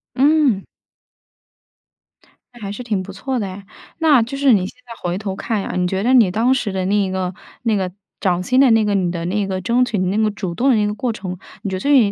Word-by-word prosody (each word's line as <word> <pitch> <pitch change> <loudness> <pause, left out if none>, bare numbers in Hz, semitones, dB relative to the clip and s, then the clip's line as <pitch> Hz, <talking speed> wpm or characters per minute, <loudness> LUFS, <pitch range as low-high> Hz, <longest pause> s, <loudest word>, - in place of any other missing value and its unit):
嗯。 280 -7 +3 1.9
那 240 - -15
还 200 -1 -4
是 230 +5 -6
挺 215 -5 -1
不 190 +1 -8
错 255 +7 -3
的 205 - -2
诶。 190 +1 -8 0.4
那 305 -6 +5
就 250 +5 -3
是 275 -2 +4
你 190 -4 +2
现 - - -13
在 235 - -9
回 175 0 -2
头 195 -2 -4
看 215 +1 -2
呀， - - -5
你 180 0 +1
觉 190 +2 -1
得 250 +3 +3
你 235 -7 +6
当 230 +7 +2
时 240 -6 -1
的 190 -1 -2
那 195 - 0
一 200 -2 +1
个 185 -1 -2 0.3
那 225 -3 +2
个 190 -2 -1 0.3
涨 180 -2 +1
薪 255 +8 +2
的 270 -1 +6
那 225 -1 +4
个， 205 - +1
你 180 -3 +1
的 170 -1 -4
那 200 +3 0
个 190 -1 -2
争 235 +6 +2
取 235 -4 -1
的 185 - 0
那 190 +3 0
个 215 0 +3
主 190 -4 -4
动 265 +7 +2
的 255 - +5
那 210 -1 +2
个 210 - -1
过 235 +4 -2
程， 185 -4 -6 0.3
你 200 - -2
觉 190 - -2
得 - - -3
对 285 - +2
于 215 -5 +4
205 Hz, 280 characters per minute, -19 LUFS, 190-245 Hz, 1.9 s, 你